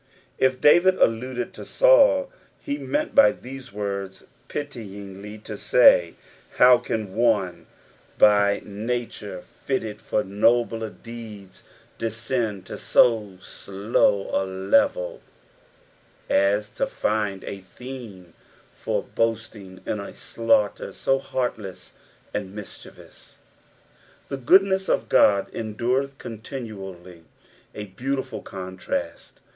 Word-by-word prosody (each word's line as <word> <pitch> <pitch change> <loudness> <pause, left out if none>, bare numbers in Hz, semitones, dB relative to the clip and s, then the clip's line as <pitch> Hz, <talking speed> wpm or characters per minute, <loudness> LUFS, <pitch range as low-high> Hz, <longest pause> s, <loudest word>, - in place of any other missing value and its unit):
If 130 -1 +2
David 175 +5 +6
alluded 120 0 0
to - - -9
Saul, - - +4 0.3
he 285 -1 -4
meant 300 +1 -2
by 280 - +7
these 130 -1 -10
words 100 -2 -5 0.2
pityingly 105 -7 -7
to 105 -2 -7
say, 90 -8 +5 0.2
" - - -26
How 125 -1 +7
can 110 -5 -4
one 110 -6 +1 0.5
by 100 -1 +4
nature 105 -3 -4 0.2
fitted 110 -6 -2
for 105 - -1
nobler 115 +3 +1
deeds, 110 -4 -11 0.4
descend 115 -3 -2
to - - -8
bo 105 -6 +4
slow 100 +1 0
a - - +2
level 280 - +1 1.1
as 100 +1 +2
to - - -1
find 105 -3 -1
a 100 - -6
theme 100 -4 -10 0.4
for - - -2
boasting 110 -4 -3
in 105 - -2
a 100 - -7
slauchter 110 -3 0
so 135 0 +1
heartless 115 -8 -4 0.4
and 100 0 -4
miscliievoUB? 105 - -12 0.3
" - - -34
" - - -31
The 140 - -3
goodness 190 +7 +4
of - - 0
Ood 100 -2 +4
endureth 125 +5 -2
eontinuauy." 100 -7 -8 0.5
A 105 - -5
beautiful 130 +8 -4
contrast. 95 -1 -6
110 Hz, 110 wpm, -24 LUFS, 100-130 Hz, 1.1 s, by